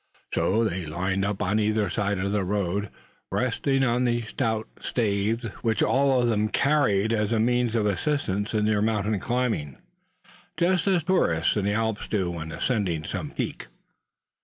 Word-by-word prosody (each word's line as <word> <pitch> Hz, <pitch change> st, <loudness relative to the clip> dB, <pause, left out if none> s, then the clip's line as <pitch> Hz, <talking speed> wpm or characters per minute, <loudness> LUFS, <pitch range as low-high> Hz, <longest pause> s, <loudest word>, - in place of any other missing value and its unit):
So 110 Hz, +4 st, +2 dB
they 90 Hz, -4 st, -4 dB
lined 95 Hz, +5 st, -1 dB
up 100 Hz, 0 st, -1 dB
on 105 Hz, +2 st, +1 dB
either 105 Hz, -1 st, +1 dB
side 100 Hz, +2 st, -1 dB
of 100 Hz, +1 st, -1 dB
the 105 Hz, -1 st, +1 dB
road, 100 Hz, +1 st, -1 dB, 0.4 s
resting 135 Hz, +2 st, +1 dB
on 125 Hz, 0 st, +2 dB
the 120 Hz, -1 st, +1 dB
stout 110 Hz, -1 st, -2 dB
staves 110 Hz, +1 st, 0 dB, 0.2 s
which 115 Hz, -2 st, +1 dB
all 135 Hz, -1 st, +3 dB
of 120 Hz, -, +2 dB
them 110 Hz, -2 st, +1 dB
carried 115 Hz, -7 st, +2 dB
as 105 Hz, -1 st, 0 dB
a 115 Hz, -, +2 dB
means 120 Hz, 0 st, +1 dB
of 110 Hz, -2 st, +2 dB
assistance 105 Hz, -, -1 dB
in 105 Hz, -1 st, +2 dB
their 105 Hz, -1 st, +2 dB
mountain 105 Hz, -1 st, 0 dB
climbing; 115 Hz, -, -1 dB, 0.8 s
just 180 Hz, +1 st, +2 dB
as 185 Hz, -4 st, +3 dB
tourists 85 Hz, -, +2 dB
in 105 Hz, -2 st, 0 dB
the 100 Hz, -, +1 dB
Alps 110 Hz, -1 st, -1 dB
do 95 Hz, -5 st, -1 dB
when 80 Hz, -2 st, -6 dB
ascending 90 Hz, -6 st, -1 dB
some -, -, -4 dB
peak. -, -, -4 dB
110 Hz, 165 wpm, -26 LUFS, 100-120 Hz, 0.8 s, all